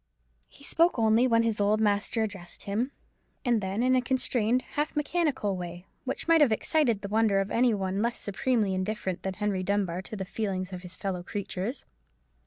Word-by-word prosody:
He -, -, -17 dB
only -, -, -6 dB
spoke 335 Hz, -2 st, +3 dB, 0.3 s
when 230 Hz, 0 st, +5 dB
his 225 Hz, -2 st, 0 dB
old 210 Hz, +1 st, +3 dB
master 210 Hz, +1 st, +1 dB
addressed 195 Hz, -5 st, -6 dB
him; 225 Hz, +7 st, -1 dB, 0.5 s
and 240 Hz, -3 st, +3 dB
then 195 Hz, +4 st, -1 dB
in 255 Hz, 0 st, +4 dB
a 255 Hz, -, +3 dB
constrained, 250 Hz, -1 st, +1 dB
half 295 Hz, +1 st, -1 dB
mechanical 295 Hz, -, 0 dB
way, 175 Hz, 0 st, -7 dB, 0.2 s
which 265 Hz, -, -3 dB
might 330 Hz, -1 st, +5 dB
have 280 Hz, -6 st, +5 dB
excited 235 Hz, -1 st, +2 dB
the -, -, -2 dB
wonder 215 Hz, -1 st, +3 dB
of 195 Hz, +1 st, -2 dB
any 240 Hz, -1 st, +3 dB
one 195 Hz, 0 st, -1 dB
less 235 Hz, +1 st, 0 dB
supremely 210 Hz, 0 st, 0 dB
indifferent 190 Hz, -1 st, -2 dB
than 190 Hz, -1 st, -3 dB
Henry 210 Hz, -2 st, -1 dB
Dunbar 185 Hz, -2 st, 0 dB
to 215 Hz, +3 st, -8 dB
the 190 Hz, -2 st, -4 dB
feelings 190 Hz, -1 st, -3 dB
of 180 Hz, -, -5 dB
his 180 Hz, 0 st, -5 dB
fellow 190 Hz, -3 st, -3 dB
creatures. 200 Hz, +5 st, -4 dB
210 Hz, 190 wpm, -28 LUFS, 190-245 Hz, 0.5 s, when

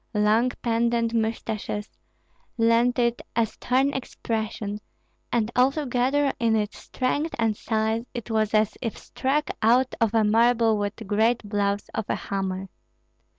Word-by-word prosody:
Long 215 Hz, +4 st, +3 dB
pendent 235 Hz, 0 st, +1 dB
mustaches 220 Hz, -2 st, -2 dB, 0.7 s
lent 230 Hz, +2 st, +3 dB
it 235 Hz, -1 st, +1 dB
a 230 Hz, 0 st, +3 dB
stern 260 Hz, +5 st, 0 dB
expression, 220 Hz, -4 st, -3 dB, 0.5 s
and 230 Hz, -1 st, +1 dB
altogether 270 Hz, +1 st, +2 dB
in 230 Hz, -1 st, +2 dB
its 210 Hz, -1 st, -2 dB
strength 290 Hz, +5 st, -2 dB
and 225 Hz, -2 st, +1 dB
size 220 Hz, +1 st, -1 dB
it 235 Hz, -2 st, -6 dB
was 220 Hz, -1 st, +1 dB
as 215 Hz, -1 st, +2 dB
if 230 Hz, -3 st, -3 dB
struck 285 Hz, +3 st, -1 dB
out 245 Hz, +4 st, +3 dB
of 225 Hz, -2 st, +3 dB
marble 225 Hz, 0 st, +3 dB
with 205 Hz, 0 st, -2 dB
great 220 Hz, +2 st, +1 dB
blows 200 Hz, 0 st, -1 dB
of 220 Hz, -, -2 dB
a -, -, +1 dB
hammer. 195 Hz, -1 st, -3 dB
225 Hz, 130 wpm, -25 LUFS, 215-245 Hz, 0.7 s, Long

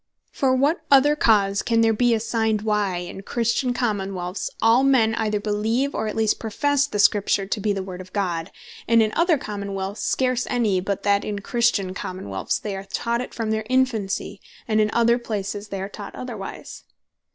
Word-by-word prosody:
For 260 Hz, -2 st, +1 dB
what 290 Hz, +6 st, +2 dB
other 285 Hz, +2 st, +6 dB
cause 200 Hz, -7 st, +3 dB
can 230 Hz, -1 st, +2 dB
there 225 Hz, 0 st, +4 dB
bee 240 Hz, +1 st, +3 dB
assigned, 220 Hz, -1 st, 0 dB
why 210 Hz, -3 st, 0 dB
in 175 Hz, +2 st, -6 dB
Christian 235 Hz, +4 st, 0 dB
Common 210 Hz, -6 st, -1 dB
wealths 180 Hz, +1 st, -4 dB
all 225 Hz, +3 st, +5 dB
men 250 Hz, -5 st, +4 dB
either 215 Hz, -2 st, 0 dB
beleeve, 220 Hz, +6 st, 0 dB
or 220 Hz, -, -2 dB
at 215 Hz, -, -4 dB
least 220 Hz, -1 st, +1 dB
professe 285 Hz, +5 st, +1 dB
the 210 Hz, -, -4 dB
Scripture 200 Hz, -1 st, +3 dB
to 210 Hz, +2 st, -2 dB
bee 210 Hz, +1 st, 0 dB
the 195 Hz, -1 st, -2 dB
Word 185 Hz, -1 st, -7 dB
of 185 Hz, 0 st, -13 dB
God, 180 Hz, -4 st, -2 dB, 0.4 s
and 230 Hz, -1 st, +5 dB
in 215 Hz, -, 0 dB
other 335 Hz, -2 st, +3 dB
Common 200 Hz, -4 st, -5 dB
wealths 195 Hz, +2 st, -4 dB
scarce 255 Hz, -1 st, 0 dB
any; 220 Hz, -7 st, +1 dB
but 195 Hz, +1 st, -3 dB
that 200 Hz, 0 st, +2 dB
in 210 Hz, -1 st, -3 dB
Christian 205 Hz, -3 st, 0 dB
Common 185 Hz, -, -6 dB
wealths 95 Hz, -1 st, -2 dB
they 205 Hz, -2 st, -4 dB
are 195 Hz, 0 st, -7 dB
taught 235 Hz, +4 st, -2 dB
it 250 Hz, -, -6 dB
from 225 Hz, -2 st, -3 dB
their 220 Hz, 0 st, -2 dB
infancy; 235 Hz, -6 st, 0 dB, 0.3 s
and 215 Hz, -1 st, +2 dB
in 210 Hz, -, +2 dB
other 235 Hz, +1 st, +3 dB
places 205 Hz, -2 st, -4 dB
they 195 Hz, -1 st, -5 dB
are 190 Hz, -, -3 dB
taught 200 Hz, 0 st, -9 dB
otherwise? 225 Hz, -6 st, -7 dB
215 Hz, 195 wpm, -23 LUFS, 200-235 Hz, 0.4 s, other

